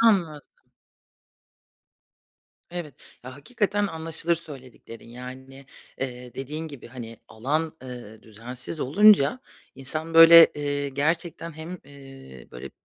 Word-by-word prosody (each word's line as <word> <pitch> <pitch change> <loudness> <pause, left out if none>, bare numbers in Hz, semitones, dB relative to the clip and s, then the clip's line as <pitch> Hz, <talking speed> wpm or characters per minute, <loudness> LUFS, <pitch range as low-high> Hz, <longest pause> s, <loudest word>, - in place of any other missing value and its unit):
Anladım. 175 -10 +2 2.3
Evet. 170 -6 -6 0.3
Ya, 130 +1 -9
hakikaten 205 - -1
anlaşılır 165 -1 -2
söylediklerin, 130 -8 -12
yani, 130 +2 -11 0.3
eee, 125 -2 -6
dediğin 150 +4 -6
gibi, 140 -5 -11
hani, 115 -2 -9
alan, 150 +8 -2
eee, 120 -4 -10
düzensiz 120 +7 -8
olunca, 200 - +5 0.3
insan 155 +5 -2
böyle, 165 0 +10
eee, 145 -1 -2
gerçekten 165 +4 -2
hem, 160 +4 -8
eee, 135 - -14
böyle 60 - -9
145 Hz, 105 wpm, -25 LUFS, 125-165 Hz, 2.3 s, böyle